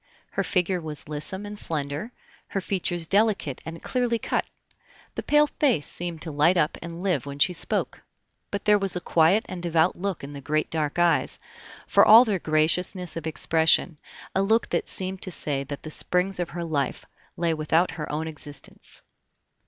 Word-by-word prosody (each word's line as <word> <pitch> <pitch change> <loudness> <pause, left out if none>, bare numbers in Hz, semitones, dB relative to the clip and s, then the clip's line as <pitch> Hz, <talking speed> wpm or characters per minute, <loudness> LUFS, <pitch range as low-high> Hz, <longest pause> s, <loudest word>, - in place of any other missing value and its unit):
Her - - -1
figure 180 -1 0
was 155 -2 -3
lissome 155 +7 -5
and 205 0 -7
slender, 150 +7 -3 0.4
her 195 - -2
features 175 -3 0
delicate 200 - +1
and 165 +1 -8
clearly 245 -2 0
cut; - - -1 0.7
the - - -4
pale 295 0 +4
face 270 - +1
seemed 170 -2 -3
to 160 - -5
light 155 +5 +3
up 155 -1 +2
and 170 +1 -7
live 170 -9 0
when 140 0 -6
she 180 +5 +3
spoke; 165 - -1 0.5
but 200 - -4
there 210 -1 +5
was 195 -2 +2
a - - -1
quiet 170 +5 +3
and 180 - -6
devout 170 0 +2
look 190 -4 -3
in 140 +1 -7
the 140 - -8
great 155 +3 -1
dark 155 -2 -1
eyes, 170 -5 +2 0.5
for - - +5
all 230 +4 +9
their 205 -5 0
graciousness 170 +3 +1
of 165 -1 -4
expression 160 0 +2 0.3
a 190 - +2
look 220 +4 +2
that - - -1
seemed 190 0 -4
to 185 - -5
say 140 -4 -2
that 140 +1 -7
the 155 - -7
springs 180 +3 -1
of 175 - -2
her 175 0 -5
life 145 -5 -2 0.3
lay 170 -1 +1
without 160 +3 +1
her 150 -3 -5
own 155 +2 -2
existence. 145 -3 -6
170 Hz, 185 wpm, -25 LUFS, 155-190 Hz, 0.7 s, all